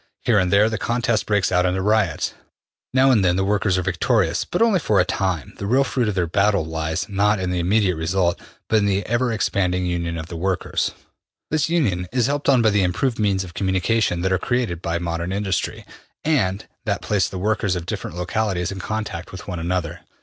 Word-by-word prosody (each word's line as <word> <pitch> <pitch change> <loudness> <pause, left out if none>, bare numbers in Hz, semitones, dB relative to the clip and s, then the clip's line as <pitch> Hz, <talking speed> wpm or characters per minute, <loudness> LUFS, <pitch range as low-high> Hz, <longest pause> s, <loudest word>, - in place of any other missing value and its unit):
Here 110 -4 +3
and 90 -1 +1
there 100 +2 +5
the 110 0 -2
contest 120 -2 0
breaks 105 -2 +1
out 90 0 +3
into 90 +1 0
riots. 100 -4 +1 0.6
Now 130 +1 +4
and 110 -6 +4
then 90 -1 +3
the 95 +1 +1
workers 100 -1 +1
are 90 - 0
victorious, 95 -1 +1
but 175 - -2
only 225 -5 +4
for 110 -9 +2
a 90 - +4
time. 90 -8 -2
The 100 - -3
real 130 +5 +4
fruit 125 -4 -1
of 105 - -1
their 90 -2 +1
battles 100 0 +1
lies, 80 +1 -2
not 105 +1 +2
in 90 -1 -2
the 90 - -1
immediate 95 0 +2
result, 85 +2 0 0.3
but 110 - +3
in 100 -1 +2
the 100 0 0
ever 120 +1 0
expanding 90 -4 0
union 85 -1 -2
of 80 - -5
the 85 - -8
workers. 95 +2 -1 0.6
This 155 0 +1
union 105 - +1
is 125 -2 +2
helped 145 +1 0
on 130 -4 +5
by 110 - +4
the 100 -1 +2
im 90 -1 +1
proved 120 +6 -1
means 100 -3 +1
of 90 -2 -10
communication 95 0 0
that 95 +1 +1
are 95 - +1
created 120 -9 -1
by 85 -1 -1
modern 85 +1 -3
industry, 95 -2 -2 0.4
and 105 -11 +1 0.2
that - - -1
place 100 -4 +1
the 95 - -6
workers 105 0 0
of 85 -1 -4
different 85 - -5
localities 95 -1 -1
in 95 - -6
contact 105 -4 -4
with 95 - -9
one 90 -3 -4
another. 85 0 -2
95 Hz, 215 wpm, -22 LUFS, 90-110 Hz, 0.6 s, there